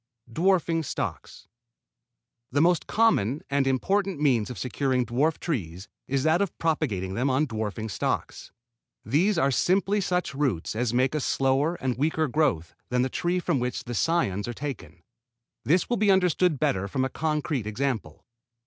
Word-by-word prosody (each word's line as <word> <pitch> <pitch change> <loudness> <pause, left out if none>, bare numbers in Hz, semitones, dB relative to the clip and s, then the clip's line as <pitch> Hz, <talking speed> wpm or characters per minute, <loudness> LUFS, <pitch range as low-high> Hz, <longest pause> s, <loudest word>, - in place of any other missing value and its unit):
DWARFING 170 0 +2
STOCKS 150 - -5 1.0
The 140 - +1
most 175 0 +2
common 155 - +2
and 140 -1 +2
important 190 +6 0
means 130 -7 +2
of 125 - -7
securing 125 +4 0
dwarf 145 +7 +1
trees 95 - -4 0.2
is 135 0 0
that 160 +4 +3
of 200 - -2
propagating 120 - -1
them 125 +7 0
on 135 +4 +2
dwarfing 110 -3 -4
stocks. 105 - -3 0.5
These 170 - +2
are 135 +1 +2
simply 195 +8 +2
such 180 -4 -1
roots 135 - -1
as 120 0 0
make 130 +3 +2
a 155 - 0
slower 135 +4 +1
and 130 -6 -3
weaker 155 +1 +1
growth 130 - 0 0.2
than 125 0 +1
the 130 - -1
trees 175 +5 -1
from 160 -7 +1
which 125 0 -3
cions 120 - 0
are 120 - -3
taken. 100 - -7 0.6
This 170 +4 +2
will 240 - 0
be 210 0 +2
understood 180 -3 +3
better 95 -3 0
from 130 +6 -1
a - - +1
concrete 150 -6 -2
example. 110 - -3
140 Hz, 155 wpm, -26 LUFS, 120-165 Hz, 1.0 s, that